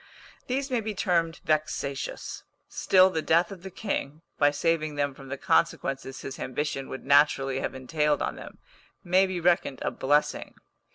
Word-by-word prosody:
These 270 +2 -2
may 245 -2 +1
be 215 -1 -4
termed 170 -3 0
vexatious; 150 -3 -2 0.2
still 185 0 +4
the 160 - -1
death 170 +5 +2
of 190 -3 -9
the 190 - -7
king, 165 -6 -4 0.2
by 145 - +6
saving 155 +1 0
them 145 -1 0
from 135 0 -13
the 140 +1 -5
consequences 135 0 0
his 135 - -7
ambition 135 +1 -3
would 130 - -7
naturally 135 -1 +4
have - - -3
entailed 150 +2 0
on - - -2
them, - - -11 0.5
may 185 +2 +4
be 185 -1 -3
reckoned 170 -5 +2
a - - 0
blessing. 145 +3 0
150 Hz, 165 wpm, -27 LUFS, 140-180 Hz, 0.5 s, by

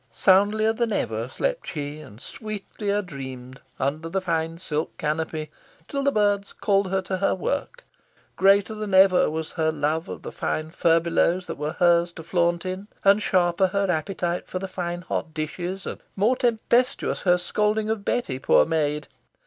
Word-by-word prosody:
Soundlier 205 - +3
than 230 0 -1
ever 115 - -2
slept - - -2
she, 145 -1 -5
and 110 -8 -12
sweetlier 205 - -4
dreamed, 130 -4 -8 0.2
under 155 +4 -1
the 195 +3 0
fine 165 -2 -1
silk 155 -3 -3
canopy, 155 0 -2 0.4
till 280 - -2
the 280 0 +2
birds 205 -3 +1
called 200 -2 +1
her 190 0 0
to 185 0 -2
her 195 - +1
work. 285 - -3 0.5
Greater 195 +2 +4
than 210 -2 -2
ever 190 -1 +6
was 160 +1 -4
her 160 -2 0
love 160 +2 -1
of - - -7
the - - -6
fine 155 0 -3
furbelows 170 +1 +2
that - - -6
were 150 +2 -2
hers 175 0 +3
to 165 - -9
flaunt 170 +1 +1
in, 185 +2 -4 0.2
and 200 +2 +5
sharper 180 -1 +2
her 200 0 0
appetite 175 +1 -2
for - - -4
the 195 +1 -4
fine 175 -1 -4
hot 160 -2 -4
dishes, 175 +5 -4
and - - -6
more 215 +6 +3
tempestuous 245 +1 +1
her 180 -1 +4
scolding 210 +4 0
of 220 -2 -2
Betty, 175 - -1
poor - - +4
maid. 150 -2 0
180 Hz, 170 wpm, -25 LUFS, 160-200 Hz, 0.5 s, ever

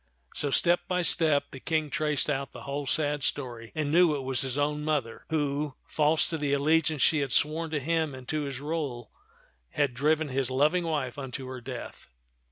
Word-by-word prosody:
So, 145 - -2
step 175 +5 +3
by 180 -1 0
step, 155 -3 +3
the 135 - -8
King 155 0 -1
traced 150 -2 +1
out 140 -2 -2
the - - -9
whole 140 0 -4
sad 150 -1 +1
story, 120 -5 -2
and 150 -2 -1
knew 170 -2 +5
it 140 - -4
was 130 0 0
his 135 -1 -2
own 150 +1 0
mother 145 -7 -2
who, 145 -2 -1
false 155 +1 +2
to 160 - -2
the 145 -1 0
allegiance 155 0 +2
she 155 - +4
had 140 -3 -1
sworn 160 +5 +1
to 155 -1 -1
him 160 0 0
and 130 -1 -11
to 155 -1 0
his 135 -2 -5
rule, 145 -7 -4 0.6
had 140 - 0
driven 150 +4 +1
his 130 -1 -1
loving 150 +7 +2
wife 145 -5 -2
unto 135 0 -6
her 130 -1 -7
death. 125 -1 -8
145 Hz, 195 wpm, -28 LUFS, 135-155 Hz, 0.6 s, knew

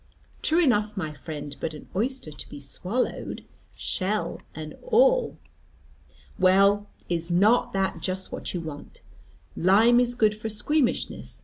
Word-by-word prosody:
"True 320 +3 +4
enough, 215 -6 +2
my 155 -5 -3
friend: 145 +1 -7
but 160 - -3
an 150 - -11
oyster 240 - -2
to 145 - -10
be - - -9
swallowed 185 - -3 0.3
shell 205 +3 -2
and 155 -1 -7
all." - - +3 1.0
"Well, 200 +2 +4 0.2
is 170 -1 -1
not 205 +8 +4
that 195 0 -1
just 190 0 -3
what - - -5
you 175 - -3
want? 155 -3 -9 0.5
Lime 220 +7 +5
is 245 0 +1
good 215 -3 +3
for 215 +1 -5
squeamishness. 260 +5 -1
200 Hz, 135 wpm, -26 LUFS, 165-240 Hz, 1.0 s, Lime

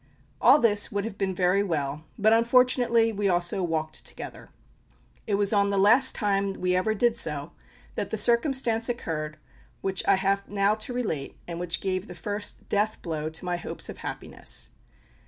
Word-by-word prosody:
All - - +7
this 210 -7 +3
would 200 0 -2
have 225 -3 -5
been 190 -1 -1
very 180 +2 +2
well, 155 -5 -2
but 220 +1 +4
unfortunately 235 -1 +3
we 200 -1 0
also 175 +1 +1
walked 155 -3 -2
together. - - -9 0.8
It 205 - +1
was 200 +1 +2
on 200 -1 +3
the 200 - 0
last 235 +7 +5
time 200 -2 0
we 180 -1 0
ever 215 +4 +1
did 235 +2 +2
so 150 -7 -3 0.4
that - - -3
the 220 - -2
circumstance 235 0 +2
occurred 155 -10 -4 0.4
which 190 -1 -1
I 195 - +6
have 195 +1 0
now 200 0 +2
to 215 +3 -2
relate, 205 - -3
and 170 -1 -5
which 175 -1 -1
gave 185 -1 -2
the 180 - -9
first 205 +4 -5
death 210 +1 0
blow 155 -2 -3
to 160 +3 -6
my 175 -1 -1
hopes 175 - -5
of - - -8
happiness. - - -4
200 Hz, 175 wpm, -26 LUFS, 175-220 Hz, 0.8 s, All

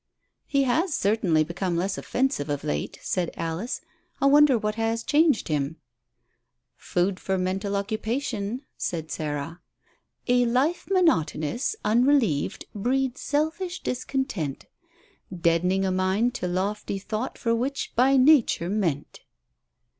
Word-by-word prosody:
"He 275 -1 +2
has 300 +6 +1
certainly 195 -6 +2
become 170 +2 -2
less 190 +3 -1
offensive 255 - -1
of 145 -1 -2
late," 75 0 -3
said 175 -2 -1
Alice. 165 +9 -3 0.4
"I - - +1
wonder 285 -2 +6
what 210 -1 -1
has 225 +1 -1
changed 300 -5 +3
him." 150 0 -1 1.0
"Food 185 +2 -1
for 190 0 -1
mental 190 +2 -1
occupation," 220 +3 -2
said 160 -3 -3
Sarah. 150 +2 -4 0.7
"'A 245 0 +4
life 270 +9 +1
monotonous, 240 - +1
unrelieved, 230 - +2
breeds 255 +4 -1
selfish 320 +5 -2
discontent, 250 - -3 0.7
Dead'ning 180 +2 +1
a 190 - +1
mind 190 +6 +1
to 180 - -3
lofty 195 +3 -2
thought 215 +5 -4
for 230 - 0
which 265 +4 -2
by 265 +3 +4
nature 255 - +4
meant.'" 170 -9 -2
210 Hz, 120 wpm, -25 LUFS, 175-265 Hz, 1.0 s, wonder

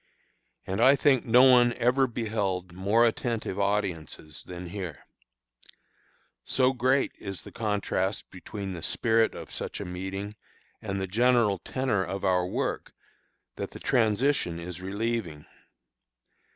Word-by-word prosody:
And 95 +1 -2
I 135 +2 +7
think 140 -3 +3
no 125 +2 +6
one 125 -2 +6
ever 125 +3 +2
beheld 105 -6 -2
more 100 +6 +3
attentive 115 -4 -1
audiences 95 -6 -2
than 90 -1 -8
here. 90 -5 -6 1.4
So 130 0 +2
great 130 +2 +2
is 95 -6 -6
the - - -11
contrast 105 -3 -1
between 95 +1 -6
the 85 - -7
spirit 115 +5 +1
of - - -9
such - - -5
a - - -5
meeting 95 +3 -5 0.4
and 100 -2 -3
the 95 - -1
general 115 -1 +3
tenor 125 0 -1
of 95 +1 -4
our 90 -1 +2
work, - - -3 0.6
that - - -4
the - - -11
transition 110 -5 +1
is 90 +1 -7
relieving. 100 -5 -3
100 Hz, 130 wpm, -27 LUFS, 95-120 Hz, 1.4 s, I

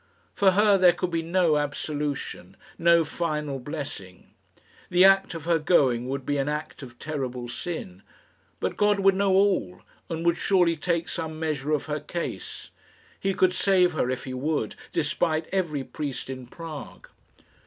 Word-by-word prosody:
For 195 -2 +4
her 205 0 +4
there 180 -1 +7
could 180 -1 -3
be 165 -1 0
no 165 -2 +2
absolution, 145 - -3 0.2
no 170 0 +5
final 150 -4 -2
blessing. 135 - -7 0.6
The 180 +1 +6
act 195 -2 +4
of 160 -2 -7
her 170 -1 +3
going 130 -7 +2
would 135 -1 -3
be 145 -1 0
an 135 +1 0
act 150 +1 -4
of 120 -3 -11
terrible 130 -5 -4
sin. 120 - -6 0.6
But - - -2
God 205 -1 +3
would 195 0 +5
know 195 0 +2
all, 190 - +2 0.3
and 165 0 -3
would 170 0 +3
surely 175 -3 +3
take 170 +1 -1
some 160 -2 -4
measure 155 -2 -2
of 150 -2 0
her 150 0 -2
case. 170 +4 -6 0.5
He 195 -1 -1
could 185 -1 +3
save 180 -2 +3
her 125 -5 0
if 130 0 -2
He 130 - -6
would, 135 -3 -1 0.2
despite 160 0 0
every 165 -8 -1
priest 140 -2 -5
in 130 -2 -8
Prague. 155 +1 -9
155 Hz, 165 wpm, -26 LUFS, 140-180 Hz, 0.6 s, there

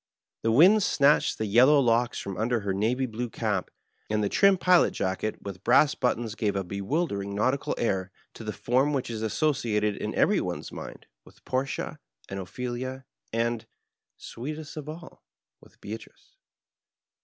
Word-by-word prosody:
The 115 - +1
winds 185 - +6
snatched 145 -2 +3
the 110 - -2
yellow 125 +8 +6
locks 120 -1 +2
from 100 -1 -5
under 115 +3 0
her 100 -1 -1
navy 115 +7 0
blue 120 0 -4
cap, 105 -5 -2 0.4
and 105 0 +1
the 100 - +1
trim 195 -1 +4
pilot 180 -1 +4
jacket 95 +3 -2
with 100 -2 -7
brass 140 +4 +5
buttons 115 -2 -1
gave 105 -3 -1
a 95 - 0
bewildering 100 - -2
nautical 130 +7 0
air 95 -5 0 0.2
to - - -10
the 105 - -3
form 130 +7 +1
which 130 -4 -2
is 110 -1 -4
associated 110 -4 0
in - - -4
every - - +3
one's - - -4
mind - - -9 0.2
with - - -20
Portia 130 +1 -2 0.3
and 95 - -4
OjpheUa 125 +6 -5 0.3
and, 115 0 -1 0.5
sweetest 150 +5 -7
of 150 -1 -7
all, 165 +2 -10 0.4
with - - -21
JBeatrice. 110 +2 -10
115 Hz, 155 wpm, -27 LUFS, 105-135 Hz, 0.5 s, winds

